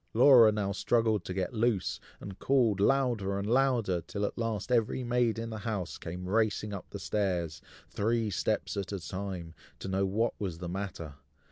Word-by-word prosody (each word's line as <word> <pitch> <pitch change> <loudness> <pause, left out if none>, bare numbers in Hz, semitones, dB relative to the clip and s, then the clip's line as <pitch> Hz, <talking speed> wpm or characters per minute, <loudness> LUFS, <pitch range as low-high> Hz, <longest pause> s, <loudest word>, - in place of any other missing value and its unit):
Laura 120 -2 +8
now 105 -2 -1
struggled 110 -1 +1
to 95 - -5
get 95 +4 -2
loose, 110 -4 0 0.2
and 95 -1 -9
called 120 -7 +2
louder 115 -5 +2
and 100 +1 -3
louder, 120 -7 +2
till 100 +3 -3
at - - -3
last 115 -1 -3
every 120 +1 +1
maid 120 -2 +1
in 115 0 -4
the 110 - -5
house 100 -4 -4
came 90 +2 -6
racing 105 0 +1
up 95 -4 -6
stairs, 90 -7 -1 0.3
three 115 0 0
steps - - -1
at 100 -1 -3
a 100 - -3
time, 90 -2 -5 0.2
to - - -7
know 95 +1 0
what 110 +4 0
was 90 -5 -3
the 90 +1 -6
matter. 90 -4 -5
105 Hz, 175 wpm, -30 LUFS, 95-115 Hz, 0.3 s, Laura